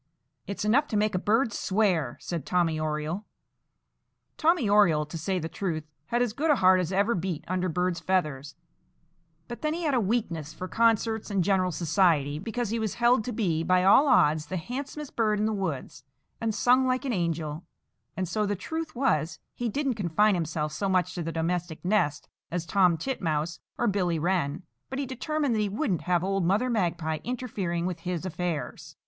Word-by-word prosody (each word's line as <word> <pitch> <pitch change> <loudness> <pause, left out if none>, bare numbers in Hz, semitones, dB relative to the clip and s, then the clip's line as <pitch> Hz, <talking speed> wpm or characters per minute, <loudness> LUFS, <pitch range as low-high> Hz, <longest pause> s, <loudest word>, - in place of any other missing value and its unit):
"It's 200 +1 -3
enough 245 +8 +3
to 215 - -1
make 210 0 +1
a 185 - +1
bird 220 +4 +2
swear," 185 - +1
said 170 -5 -4
Tommy 170 -2 +1
Oriole. 155 +5 -3 1.1
Tommy 325 -6 +2
Oriole, 195 -7 +4
to 150 - -10
say 185 +4 -1
the 160 -2 -3
truth, 165 -2 -3 0.2
had 240 +1 +1
as 235 -4 -2
good 305 +7 -1
a 295 - +6
heart 185 -4 +5
as 180 -1 -2
ever 200 +5 +2
beat 180 -4 -3
under 185 +1 -1
bird's 180 +1 0
feathers; 150 -6 -1 0.9
but 240 - -7
then 305 +1 0
he 345 - -4
had 300 -3 +1
a 255 - +3
weakness 180 -8 -2
for 185 +3 -5
concerts 225 0 +1
and 195 -3 +1
general 185 -1 +2
society, 155 -3 +2
because 225 +3 -3
he 230 - 0
was 220 -3 -2
held 240 -1 +3
to 250 - -3
be, 185 -8 0
by 180 +2 +3
all 235 +10 +6
odds, 155 - +4
the 185 - -3
handsomest 275 - -6
bird 215 -2 +2
in 210 - +1
the 220 - 0
woods, 170 -11 -4 0.4
and 225 -2 -1
sung 255 +1 +4
like 255 +2 0
an 260 - 0
angel; 165 -3 -2 0.5
and 185 -1 -1
so 210 +6 -1
the 205 - 0
truth 320 - -5
was 240 - +1 0.2
he 240 -1 -2
didn't 275 +3 0
confine 205 +1 +2
himself 160 -3 -2
so 195 +4 -1
much 180 -1 +1
to 175 - -4
the 165 0 -3
domestic 165 0 -2
nest 175 -8 +1 0.2
as 170 -1 -3
Tom 180 -3 +3
Titmouse 160 - -2 0.2
or 240 - 0
Billy 185 -5 +1
Wren. 170 -1 0 0.3
But 265 - -4
he 280 - -1
determined 275 +2 -1
that 220 - +1
he 205 - 0
wouldn't 200 - -1
have 175 -1 +1
old 195 0 0
Mother 210 +9 +2
Magpie 170 -7 -1
interfering 205 -9 -3
with 180 -2 -3
his 180 0 -4
affairs. 175 -3 -4
185 Hz, 190 wpm, -27 LUFS, 165-225 Hz, 1.1 s, a